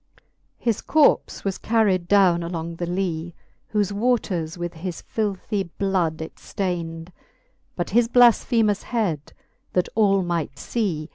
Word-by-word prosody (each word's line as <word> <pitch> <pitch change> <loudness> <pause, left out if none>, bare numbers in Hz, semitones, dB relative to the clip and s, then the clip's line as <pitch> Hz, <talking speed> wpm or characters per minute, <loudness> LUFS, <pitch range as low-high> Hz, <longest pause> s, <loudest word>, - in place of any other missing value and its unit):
XIX. - - -34 0.3
His 230 -3 -1
corps 305 -2 +3
was 195 -1 -1
carred 205 -6 +2
downe 185 -3 +4
along 170 -1 -4
the 175 - -3
Lee, 175 -2 -2 0.4
Whoie 205 -2 +1
waters 200 -8 0
with 175 0 -4
his 170 +1 -6
filrhy 200 -2 -2
bloud 180 -6 0
it 160 - -10
ftayned: 170 -3 -4 0.7
But 175 - -3
his 235 +2 +4
bhiShem* 230 -3 +4
head, 195 - -2 0.4
that 180 - +1
all 195 -3 +3
might 170 -5 -2
fee. 170 -7 -2
185 Hz, 135 wpm, -23 LUFS, 170-210 Hz, 0.7 s, downe